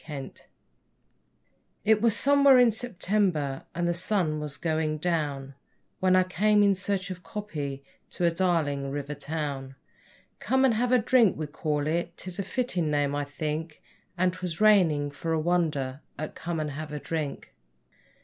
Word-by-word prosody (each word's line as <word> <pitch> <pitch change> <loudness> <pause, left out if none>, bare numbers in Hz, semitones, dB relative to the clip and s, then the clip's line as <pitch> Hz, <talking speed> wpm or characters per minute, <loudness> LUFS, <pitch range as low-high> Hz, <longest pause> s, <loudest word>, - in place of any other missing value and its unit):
Sweeney 145 -4 -7 1.5
It 215 0 +4
was 230 -2 +4
somewhere 280 -1 +6
in 245 -2 +6
September, 185 - -1
and 175 0 0
the 175 - +1
sun 170 -3 0
was 150 -2 -5
going 155 -2 -1
down, 145 -5 -2 0.5
When 185 0 +3
I 185 - +5
came, 205 +3 +3
in 200 -1 +5
search 195 0 -2
of 180 -1 -7
'copy', 155 -7 -5 0.3
to 175 - -2
a 170 - +4
Darling 165 -6 0
River 145 +1 -4
town; 140 -3 -4 0.6
'Come 265 +2 +2
and 255 - +4
have 240 +3 0
a 255 - +6
drink' 235 -3 +3
we'll 155 -1 -4
call 150 -1 -2
it 170 +2 -2
'tis 185 +1 -4
a - - 0
fitting 190 -7 -1
name, 145 -1 +1
I 145 0 -1
think 150 +2 -4 0.4
And 180 0 +2
'twas 180 -3 -4
raining, 170 -9 +4
for 165 +3 -3
a 160 - +1
wonder, 155 -5 0 0.2
up 155 - -4
at - - -21
Come 165 0 -4
and 150 -1 -2
have 150 +1 -6
a 150 - -4
drink. 155 -2 -4
165 Hz, 170 wpm, -27 LUFS, 150-195 Hz, 1.5 s, somewhere